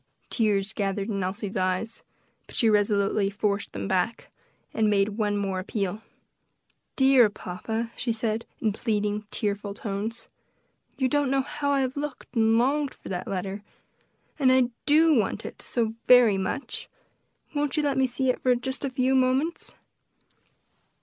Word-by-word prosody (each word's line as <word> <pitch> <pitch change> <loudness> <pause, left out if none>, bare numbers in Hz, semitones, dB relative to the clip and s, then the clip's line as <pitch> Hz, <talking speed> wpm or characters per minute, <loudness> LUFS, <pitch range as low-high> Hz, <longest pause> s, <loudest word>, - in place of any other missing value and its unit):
Tears 205 -3 +1
gathered 200 +1 -2
in 195 -3 -1
Elsie's 195 +2 -4
eyes, 185 +4 -1 0.5
but - - -12
she 225 -2 +3
resolutely 205 -1 +2
forced 200 0 -1
them - - -4
back, 190 +3 -1 0.4
and 220 -1 +2
made 200 0 +3
one 205 -1 -1
more 195 -2 -1
appeal. 200 +1 -3 0.9
"Dear 265 -4 +6
papa," 220 +4 -4
she 240 - -1
said, 225 0 -2
in 215 -3 0
pleading, 210 -1 -1
tearful 205 -1 -2
tones, 220 +3 -4 0.7
"you 260 - +2
don't 290 0 +1
know 270 0 +2
how 285 +1 -3
I 280 -1 +3
have 260 0 -1
looked 290 -2 -6
and 225 0 +4
longed 275 +3 +1
for - - -11
that 180 -1 -4
letter; 195 +1 -3 0.8
and 260 -3 +5
I 260 -2 +4 0.2
do 315 +2 +5
want 220 -3 0
it - - -8
so 225 -2 -1
very 240 -6 +7
much; 190 +9 -4 0.6
won't 290 0 -1
you 300 - +2
let 285 -1 +1
me 260 - +4
see 255 +1 +1
it - - -7 0.2
just 265 0 -3
for 280 - -1
a - - -6
few 255 +1 +1
moments?" 265 +5 +1
220 Hz, 155 wpm, -26 LUFS, 200-260 Hz, 0.9 s, very